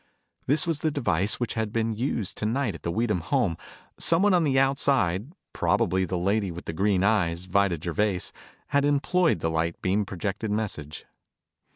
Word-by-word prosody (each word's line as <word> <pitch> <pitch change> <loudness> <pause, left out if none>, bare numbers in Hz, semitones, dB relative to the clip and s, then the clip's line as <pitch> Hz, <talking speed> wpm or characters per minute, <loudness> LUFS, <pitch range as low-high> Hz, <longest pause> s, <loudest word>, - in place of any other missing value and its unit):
This 145 +2 +4
was 165 -3 -1
the 155 - +1
device 110 - 0
which 120 - -2
had 110 -2 -2
been 115 0 0
used 115 -3 -2
tonight 115 +1 -1
at 85 - -10
the - - -3
Weedham 110 0 0
home. 80 +1 0 0.4
Someone 185 +4 +4
on 175 -2 +4
the 135 -3 +2
outside, 135 - +1 0.2
probably 95 +2 +1
the 90 0 -3
lady 100 +3 0
with 85 0 -8
the - - -4
green 95 +2 +1
eyes, 90 -5 +1
Vida 95 -1 +1
Gervais, 90 +3 -1 0.4
had 140 0 +2
employed 145 - +2
the 80 - 0
light 80 +1 -1
beam 95 +3 +1
projected 100 +3 -4
message. 95 -8 -4
105 Hz, 170 wpm, -26 LUFS, 90-135 Hz, 0.4 s, This